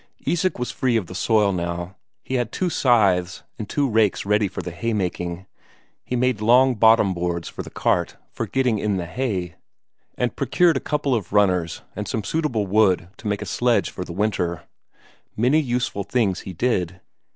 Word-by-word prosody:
Isak 180 +2 0
was 125 0 -3
free 125 -3 +1
of 105 - -2
the 90 - -10
soil 105 +1 +2
now; 85 +1 -4 0.3
he - - -6
had 120 -3 0
two 180 -2 -1
scythes 95 - +2 0.2
and 110 - -5
two 145 -1 +1
rakes 110 -5 +1
ready 105 0 +2
for 95 - -6
the 90 - -5
haymaking; 90 -2 -3 0.6
he 125 - -3
made 125 -3 +1
long 125 +4 +5
bottom 110 -3 +4
boards 85 -1 -2
for - - -6
the - - -9
cart - - 0
for - - -4
getting 125 -5 +1
in 105 -2 0
the 90 - -3
hay, 90 -5 -3 0.6
and 125 -1 -1
procured 165 +5 +3
a - - +1
couple 145 -2 -1
of 110 -6 -2
runners 90 -5 +2
and 105 -1 -4
some 110 - -2
suitable 130 -7 -1
wood 95 -3 +2
to 110 - -7
make 105 -1 -1
a - - -7
sledge 120 -1 +1
for 90 - -5
the 90 - -9
winter. 90 -3 -1 0.7
Many 125 +8 +3
useful 125 -7 -1
things 100 -2 0
he 95 - -8
did. 95 -4 -1
105 Hz, 185 wpm, -23 LUFS, 90-125 Hz, 0.7 s, long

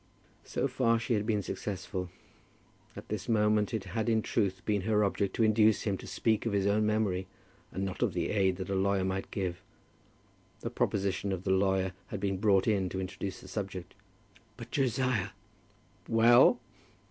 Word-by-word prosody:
So - - -1
far 125 -3 +2
she 115 +2 -1
had 105 -1 0
been 105 -3 +1
successful. 95 -2 -4 0.9
At - - -10
this 105 +2 -4
moment 105 -2 +2
it 110 -4 -2
had 110 +4 -2
in 110 -1 +2
truth 95 -4 -1
been 105 -2 +1
her 105 +2 +2
object 100 -1 0
to 115 - +2
induce 110 0 +4
him 100 -3 0
to - - -9
speak 110 +4 0
of 110 - -1
his 100 -1 +1
own 105 +1 +2
memory, 100 -4 0 0.4
and 95 +1 -3
not 95 - -5
of - - +1
the - - -1
aid 95 -3 +2
that 95 +1 -5
a - - 0
lawyer 95 0 +1
might 95 0 -3
give. 90 -3 -3 1.0
The - - -4
proposition 100 0 -1
of 95 -1 -3
the 95 - 0
lawyer 95 0 +2
had 105 - -5
been 95 -1 -1
brought 100 -1 +3
in 100 -4 +1
to 95 - -4
introduce 95 +1 -5
the - - -12
subject. 95 -2 -5 0.6
"But, - - -10
Josiah, 130 -5 0 0.5
" 100 -2 -34
"Well?" 115 +1 +6
100 Hz, 180 wpm, -30 LUFS, 95-110 Hz, 1.0 s, Well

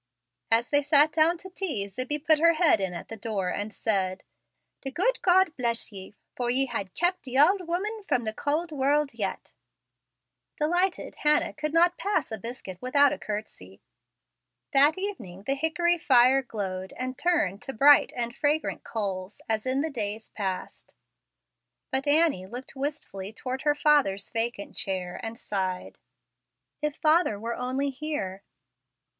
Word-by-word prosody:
As 230 +2 +3
they 290 0 +3
sat 295 +1 +5
down 325 +3 +3
to 375 - -11
tea, 310 - -2
Zibbie 255 +9 -3
put 315 -1 +5
her 335 +1 +5
head 320 - +3
in 190 -1 -1
at 175 - -7
the 225 - -6
door, 210 -4 -3
and 205 +4 -3
said, 190 -4 -1 0.6
"The 270 - -4
gude 405 - 0
God 370 -3 +4
bless 235 -2 -1
ye, 195 +1 -9 0.2
for 245 -1 -1
ye 265 +2 +4
ha' 195 -7 -4
kept 355 +1 +1
the 260 -2 -4
auld 365 +8 +5
'ooman 380 +6 -3
fra - - +3
the 220 -3 -4
cauld 310 +7 -2
wourld 285 0 +1
yet." 205 -4 -4 1.0
Delighted 350 +5 0
Hannah 300 0 +2
could 305 -1 -3
not 345 +2 +3
pass 370 - -1
a 220 - -4
biscuit 195 -5 -8
without 280 +3 +4
a - - -6
courtesy. 205 - -7 0.9
That 285 +4 +5
evening 230 - -6
the 270 - 0
hickory 330 +4 +1
fire 260 -1 +5
glowed 190 -6 -5
and 255 0 -3
turned 255 - 0
to - - -4
bright 280 +5 +6
and 235 0 -3
fragrant 300 +2 0
coals 195 -3 -4
as 220 +2 -1
in 265 +2 +1
the 315 +1 -2
days 220 -3 -3
past, 190 -3 -5 1.0
but 265 +2 -1
Annie 290 - +3
looked 245 +6 -8
wistfully 265 -9 -5
toward 260 +3 -5
her 295 0 +2
father's 285 -11 +2
vacant 230 -3 -2
chair, 180 -2 -3
and 225 +1 -6
sighed, 190 -5 -4 0.8
"If 300 -1 -1
father 310 - +2
were 230 +2 -3
only 260 +3 -2
here!" 260 -10 -4
260 Hz, 160 wpm, -27 LUFS, 210-305 Hz, 1.0 s, bright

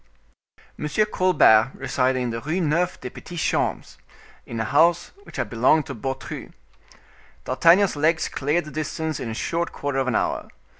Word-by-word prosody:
M 150 - -2 0.2
Colbert 130 -10 +4
resided 130 0 0
in 125 -1 -2
the 115 0 -4
Rue 160 +5 -2
Neuve 170 +2 0
des 125 - -6
Petits 175 -1 -8
Champs, - - -1 0.5
in 115 - -5
a - - 0
house 165 +7 +3
which - - -13
had - - -1
belonged 130 +6 +3
to - - -6
Beautru. 135 +3 -6 0.9
D'Artagnan's 180 +3 +4
legs 160 +3 +1
cleared 150 +5 -1
the 150 - -9
distance 155 0 -3
in 120 - -4
a 110 - -5
short 170 +7 -2
quarter 140 -1 -3
of 135 - -1
an 125 - 0
hour. - - -1
150 Hz, 165 wpm, -23 LUFS, 130-170 Hz, 0.9 s, Colbert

